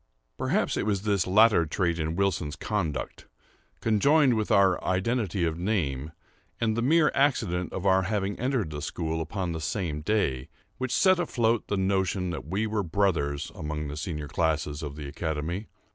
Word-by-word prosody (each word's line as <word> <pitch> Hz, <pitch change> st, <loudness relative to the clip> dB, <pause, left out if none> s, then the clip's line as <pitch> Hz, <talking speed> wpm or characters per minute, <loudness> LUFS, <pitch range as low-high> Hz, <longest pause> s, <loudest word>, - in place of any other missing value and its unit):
Perhaps -, -, 0 dB
it -, -, -1 dB
was 100 Hz, -2 st, 0 dB
this 100 Hz, -4 st, +1 dB
latter 105 Hz, -1 st, +5 dB
trait 85 Hz, +1 st, 0 dB
in 80 Hz, +1 st, -2 dB
Wilson's 90 Hz, -6 st, 0 dB
conduct, 85 Hz, -6 st, -3 dB, 0.5 s
conjoined 135 Hz, +5 st, +4 dB
with 110 Hz, -2 st, -1 dB
our 95 Hz, -1 st, +4 dB
identity 100 Hz, 0 st, 0 dB
of 80 Hz, 0 st, -2 dB
name, 80 Hz, -8 st, -1 dB, 0.5 s
and 110 Hz, -2 st, +1 dB
the 115 Hz, -, 0 dB
mere 150 Hz, +5 st, +4 dB
accident 90 Hz, -11 st, +1 dB
of 95 Hz, -, -5 dB
our 95 Hz, -1 st, +4 dB
having 100 Hz, +1 st, -1 dB
entered 125 Hz, -, 0 dB
the 75 Hz, -1 st, -5 dB
school 80 Hz, +2 st, -3 dB
upon 90 Hz, +2 st, -3 dB
the 80 Hz, -1 st, -4 dB
same 80 Hz, -4 st, -2 dB
day, 75 Hz, -9 st, 0 dB, 0.3 s
which 130 Hz, -1 st, -2 dB
set 185 Hz, +7 st, +4 dB
afloat 120 Hz, -9 st, +1 dB
the 100 Hz, -, -1 dB
notion 95 Hz, -1 st, 0 dB
that 80 Hz, -, -6 dB
we 100 Hz, +6 st, -1 dB
were 110 Hz, -1 st, -1 dB
brothers, 80 Hz, -6 st, 0 dB
among 75 Hz, -1 st, -4 dB
the 70 Hz, -, -5 dB
senior 75 Hz, -1 st, -4 dB
classes 75 Hz, -1 st, -1 dB
in 75 Hz, -2 st, -5 dB
the 75 Hz, -2 st, -7 dB
academy. 80 Hz, +6 st, -3 dB
95 Hz, 170 wpm, -27 LUFS, 80-110 Hz, 0.5 s, latter